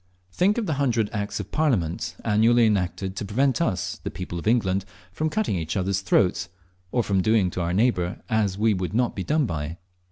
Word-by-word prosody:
Think 195 - +2
of 235 - 0
the 160 - -1
hundred 115 -6 +1
Acts 100 -1 -3
of 100 -1 -6
Parliament 90 - 0
annually 115 +2 +4
enacted 95 -2 0
to - - -2
prevent 130 +9 +1
us, 95 - -1
the - - -3
people 90 -1 -6
of 85 - -6
England, 100 -5 +2 0.3
from 155 +11 -1
cutting 215 - 0
each 85 +2 -3
other's 95 +1 0
throats, 90 -2 +2 0.4
or 120 - +1
from 95 -3 +1
doing 105 -2 +2
to 90 - -3
our 85 0 -1
neighbour 95 -3 +1
as 105 -3 0
we 110 +1 +3
would 95 +1 -3
not 120 0 +1
be 95 - -3
done 150 +4 +1
by. 80 -4 -4
100 Hz, 200 wpm, -25 LUFS, 90-120 Hz, 0.4 s, annually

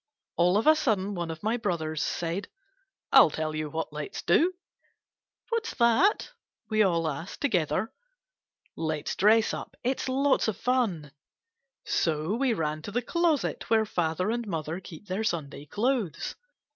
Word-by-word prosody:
All 180 +3 +3
of 215 - 0
a 310 +1 +7
sudden 210 -10 0
one 170 -3 -3
of 160 +3 -7
my 220 +3 +1
brothers 160 -8 -2
said, 175 +4 -2 0.3
* 390 -6 -48
I - - +10
'11 - - +5
tell 155 0 -2
you 155 -1 -3
what 160 0 -4
let 150 -1 -6
's - - -5
do! 335 - +3 0.3
' - - -43
* - - -44
What's 460 -1 -2
that?' 260 - +3 0.4
we 215 0 +3
all 170 -5 +2
asked 155 +5 -5
together. 185 - 0 0.8
*Let 155 -2 -2
's - - -2
dress 220 +3 +4
up! - - -7
It's 260 +1 -1
lots 270 0 +2
of 215 -3 -1
fun.' 220 - 0 0.7
So 160 +3 0
we 255 +2 +1
ran; 155 -6 -1
to 205 - -7
the 245 +3 -1
closet 340 -1 0
where 220 -1 +4
father 180 0 -1
and 235 -1 -2
mother 165 -1 -3
keep 180 0 -11
their 195 +3 -2
Sunday 150 -7 -3
clothes. 210 - -1
195 Hz, 170 wpm, -28 LUFS, 160-235 Hz, 0.8 s, I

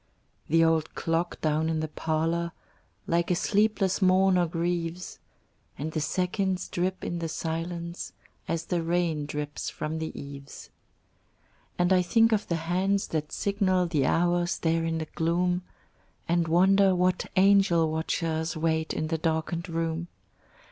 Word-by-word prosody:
The 165 +2 +5
old 160 -1 +1
clock 165 +1 -1
down 155 +1 +1
in 160 -1 0
the 155 - -2
parlor 165 +2 -1 0.5
Like 170 0 +1
a 180 - +3
sleepless 205 0 +1
mourner 185 -1 +4
grieves, 170 +1 -3 0.6
And 155 +4 -4
the 155 - -2
seconds 185 +3 -1
drip 185 +2 -2
in 175 - -3
the 165 -1 -3
silence 170 +2 -4 0.4
As 165 0 -2
the 175 -1 -1
rain 165 -3 0
drips 150 0 -4
from 155 +1 -4
the 160 - -3
eaves. 140 -1 -10 1.1
And 175 +1 +3
I 185 - +5
think 225 +5 +3
of 215 -1 +1
the 170 - 0
hands 195 +3 +1
that 155 -1 -2
signal 195 -3 +1
The 150 -6 +1
hours 175 0 +1
there 165 0 +1
in 165 0 -1
the 160 - -3
gloom, 175 +3 0 0.7
And 170 0 +1
wonder 190 +3 +4
what 180 0 +1
angel 185 -4 +4
watchers 160 0 -1
Wait 160 0 0
in 155 0 -2
the 160 -1 -1
darkened 165 +2 -1
room. 165 0 -2
170 Hz, 145 wpm, -27 LUFS, 160-180 Hz, 1.1 s, The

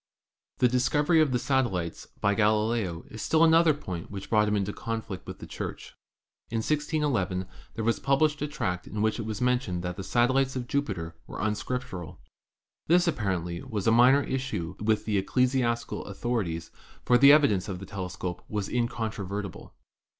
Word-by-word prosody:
The 125 - +4
discovery 145 +6 +3
of 150 -4 +2
the 125 - +2
satellites 120 - -1
of - - -27
Jupiter - - -34
by 100 0 +3
Galileo 105 -4 +1
was 110 - -7
still 160 0 +3
another 165 -1 +5
point 90 - -6
which 100 -1 -8
brought 105 -1 +4
him 105 - +1
in 100 -1 +1
conflict 110 -1 -5
with - - -7
the - - -9
Church. - - -7 0.6
In 115 - -2
161 150 +2 0
1 95 -3 -1 0.3
there 115 - -3
was 115 - +1
published 150 +2 +2
a 150 - 0
tract 90 -11 -3
in 105 0 -2
which 110 +2 +1
it 110 - -4
was 110 0 -4
mentioned 125 -8 0
that 90 0 -4
the 95 - -5
satellites 130 +5 +2
of 125 -1 -3
Jupiter 95 -13 -2
were - - -7
un 110 0 +1
scriptural. 105 -7 -5 0.7
This, 175 +2 +4
apparently, 95 - -1
was 110 -8 -4
a 115 - +5
minor 125 +5 +6
issue 130 -11 -3
with 110 0 +1
the 105 -2 +1
ecclesiastical 125 +2 0
authorities, 100 -6 -3 0.3
for 125 0 +5
the 140 +2 +9
evidence 110 -11 +4
of 95 - -3
the 95 - -8
telescope 90 -2 -5
was 105 -2 -2
incontrovertible. 110 -5 -3
110 Hz, 180 wpm, -28 LUFS, 95-130 Hz, 0.7 s, the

